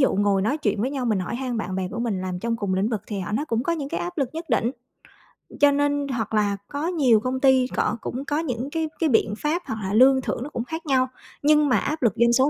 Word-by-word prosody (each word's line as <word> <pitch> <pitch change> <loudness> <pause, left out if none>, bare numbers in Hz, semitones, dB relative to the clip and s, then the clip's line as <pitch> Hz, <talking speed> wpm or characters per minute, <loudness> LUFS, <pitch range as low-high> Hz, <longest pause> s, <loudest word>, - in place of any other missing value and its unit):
dụ 265 - +3
ngồi 200 -1 +2
nói 270 +10 0
chuyện 210 -6 0
với 255 +4 0
nhau, 270 -3 -3
mình 215 -5 +1
hỏi 185 +6 -3
han 250 -2 -3
bạn 190 -3 -3
bè 185 -1 -2
của 230 - -5
mình 220 -6 -1
làm 185 -1 -3
trong 230 +3 -1
cùng 200 -4 -1
lĩnh 195 +4 +1
vực 220 -4 -2
thì 200 -3 -4
họ 195 - -5
nói 275 +8 0
cũng 230 -4 -1
có 340 - 0
những 290 -4 -3
cái 335 - -3
áp 350 -1 -5
lực 270 -3 +1
nhất 330 +1 -4
định, 230 0 +2 0.9
cho 290 0 +7
nên 285 0 +1
hoặc 230 -5 -3
là 205 -2 +2
có 290 +3 -3
nhiều 275 -11 +4
công 255 +3 -2
ty 260 -2 +4
cọ 235 - 0
cũng 265 +3 -4
có 295 +1 0
những 255 -4 -3
cái 320 -1 -1
cái 320 -3 +2
biện 225 -3 +2
pháp 320 +4 0
hoặc 220 - -4
là 195 +1 -2
lương 265 +3 +6
thưởng 245 - -3
nó 290 - -6
cũng 240 - -3
khác 320 +6 -6
nhau, 260 -3 +2 0.4
nhưng 300 0 +4
mà 250 - +4
áp 310 +2 -2
lực 230 -6 +3
doanh 235 +1 +4
số 265 +3 +4
250 Hz, 285 wpm, -24 LUFS, 220-290 Hz, 0.9 s, cho